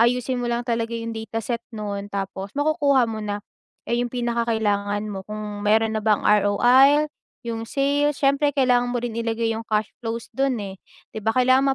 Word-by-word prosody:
ayusin 250 +2 +2
mo 240 - -2
lang 240 0 -1
talaga 235 -1 -1
yung 230 0 -4
data 225 0 -5
set 235 0 -2
nun, 205 -3 -5
tapos 195 -1 -4
makukuha 290 -3 +3
mo 225 -1 -4
na. 205 -1 -4 0.4
Eh 235 - 0
yung 245 - -1
pinaka-kailangan 220 -4 0
mo 195 - -5
kung 210 -1 -5
meron 220 +2 +3
na - - -3
bang 210 -1 +2
ROI, 255 +9 +5 0.3
yung 230 -1 -4
sales, 285 +3 +1
siyempre 280 +1 +3
kailangan 250 -3 +3
mo 240 - -1
rin 235 -2 -3
ilagay 230 0 -1
yung 225 0 -4
cash 215 -1 0
flows 230 0 -5
dun 265 -5 0
eh, 195 -1 -7 0.3
'di - - -6
ba 220 +1 0
kailangan 260 +2 +4
230 Hz, 185 wpm, -23 LUFS, 215-250 Hz, 0.4 s, ROI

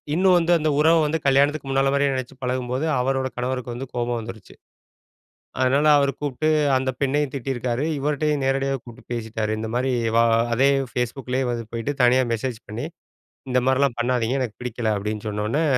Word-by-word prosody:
இன்னும் 185 0 +4
வந்து, 170 +1 +1
அந்த 155 0 +1
உறவ 165 +2 +5
வந்து 160 +2 -1
கல்யாணத்துக்கு 140 +1 +2
முன்னால 135 0 +2
மாரியே 140 -1 +2
நினச்சு 130 0 -5
பழகும்போது, 125 +3 -1
அவரோட 130 +1 0
கணவருக்கு 125 -1 -3
வந்து 135 +2 -6
கோபம் 120 -1 -1
வந்துருச்சு. 110 -2 -10 1.1
"அதனால 135 +4 +3
அவர 140 -1 +2
கூப்ட்டு 145 +2 -1 0.3
அந்த 130 0 -1
பெண்ணையும் 145 +1 0
திட்டியிருக்காரு. 130 +1 -2
இவர்டயும் 150 0 0
நேரடியாவே 135 0 0
கூப்பிட்டு 120 0 -14
பேசிட்டாரு." 110 -2 -3
இந்த 110 0 -4
மாரி, 130 +1 0 0.2
"வா 115 - +5 0.3
அதே 135 +3 +4 0.2
ஃபேஸ்புக்லேயே 125 +1 -2
வந்து 115 -1 -4
போயிட்டு 115 +5 -2
தனியா 130 +1 +5
மெசேஜ் 115 0 -3
பண்ணி 115 +7 -4 0.7
இந்த 125 - +2
மாரிலாம் 130 -2 +2
பண்ணாதீங்க 125 +1 0
எனக்கு 115 -4 -4
பிடிக்கல." 115 -2 -2
அப்படீன்னு 105 +1 -4
சொன்ன 105 0 -3
உடனே 150 +7 +1
130 Hz, 165 wpm, -23 LUFS, 120-140 Hz, 1.1 s, உறவ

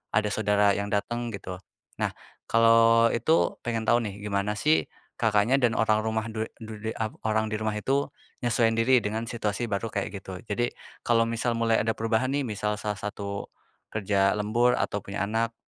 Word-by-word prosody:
ada 105 0 +2
saudara 105 -1 +3
yang 100 0 -2
datang 120 +3 -1
gitu. 95 -2 -7 0.4
Nah, - - 0 0.4
kalau 115 0 +5
itu, 160 +7 +2
pengen 115 -1 -1
tahu 120 +2 +4
nih, 100 - -9
gimana 105 +1 -1
sih, 155 +6 +2 0.3
Kakaknya 110 +3 +3
dan 115 -2 +2
orang 110 -1 +3
rumah 110 0 -1
du 110 0 -1
du 110 -2 -9
di 110 - -3
ap 110 -1 -2
orang 110 0 +1
di 110 - -5
rumah 110 -1 -2
itu 135 +6 0 0.3
nyesuaiin 115 -1 +2
diri 125 +3 +5
dengan 110 +2 -1
situasi 115 0 -2
baru 105 +2 -1
kayak 100 - -1
gitu. 95 -1 -8
Jadi, 120 +3 -1 0.3
kalau 115 -1 +4
misal 115 +1 0
mulai 115 -1 +2
ada 110 0 0
perubahan 115 +4 0
nih, 145 - +1
misal 105 -2 -2
salah 105 0 -3
satu 100 -1 -5 0.5
kerja 100 -2 +2
lembur, 120 +4 +2
atau - - -1
punya 100 0 -3
anak, 115 +1 0
110 Hz, 180 wpm, -27 LUFS, 105-115 Hz, 0.5 s, kalau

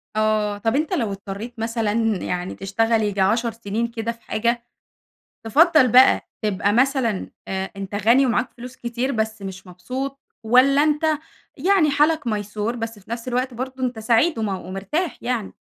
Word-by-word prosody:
آه 215 -1 +1
طب 225 +5 0
أنتَ 305 +2 0
لو 225 -6 0
اضطريت 200 +4 -7
مثلًا 225 -1 -1 0.3
يعني 180 0 -3
تشتغل 225 +3 +1
ييجي 205 -2 -1
10 230 +4 +2
سنين 225 +1 -3
كده 230 0 -3
في 230 0 -14
حاجة، 235 +2 -1 0.8
تفضّل 305 - +5
بقى 255 +3 +5
تبقى 205 -1 +1
مثلًا 250 -3 +1 0.2
آآ 190 0 -3
أنتَ 195 0 -6
غني 235 +6 +4
ومعاك 245 +1 0
فلوس 250 +1 -10
كتير 240 +3 -2
بس 220 -2 -2
مش 190 0 -7
مبسوط، 255 +10 -5 0.3
والّا 265 +5 +5
أنتَ 300 +1 +1 0.5
يعني 340 0 +3
حالك 300 0 +2
ميسور 210 +2 -2
بس 225 -1 -5
في 205 +2 -19
نفس 235 +1 -4
الوقت 250 +1 -1
برضو 260 +2 -5
أنتَ 245 -2 -1
سعيد 230 +7 +2
وم 220 - -1
ومرتاح 195 - -3
يعني؟ 240 -4 -2
230 Hz, 160 wpm, -22 LUFS, 210-255 Hz, 0.8 s, تفضّل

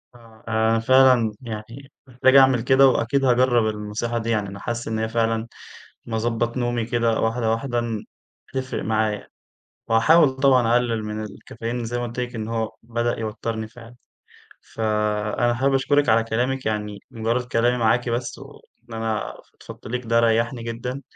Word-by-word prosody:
آه، 115 -2 -18
أنا 110 0 +2
فعلًا 130 -1 +5
يعني، 115 +3 -8 0.2
محتاج 130 +1 +2
أعمل 130 -3 +6
كده 135 +2 +5
وأكيد 130 +2 +1
هاجرب 120 -2 +3
النصيحة 105 +3 -3
دي 115 0 -3
يعني، 105 -3 0
أنا 100 0 -9
حاسس 120 +2 -4
إن 110 0 -2
هي 110 0 -1
فعلًا 115 0 0 0.6
لما 115 - -3
اضَبَّط 115 +1 -1
نومي 120 -2 -1
كده 115 -1 0
واحدة 115 0 0
واحدة 120 +2 -1
إن 115 -3 -3 0.5
هتفرق 130 -1 -3
معايا، 110 -1 -1 0.6
وهاحاول 140 +7 +5
طبعًا 130 -4 +3
أقلل 120 -3 +1
من 105 0 -4
الكافيين 115 +3 -6
زي 120 +2 -3
ما 120 - -2
قلت 120 +1 -5
لِك 125 -1 -4
إنه 115 +1 -4
هو 110 -1 -2
بدأ 120 +1 -2
يوترني 110 0 -4
فعلًا، 115 +1 -14 0.8
فأنا 105 +1 0
حابب 135 +3 +1
أشكرِك 145 +2 +2
على 115 +1 +4
كلامِك 125 +4 -1
يعني 105 -2 -3
مجرد 115 +2 -1
كلامي 120 0 +1
معاكِ 120 +1 +1
بس، 120 +2 -3
وإن 115 - -15
أنا 110 -1 -3 0.3
فضفضت - - -11
ليكِ 125 +1 -4
ده 115 +1 +3
ريحني 115 +1 +1
جدًا، 120 +3 -5
115 Hz, 160 wpm, -23 LUFS, 110-125 Hz, 0.8 s, أعمل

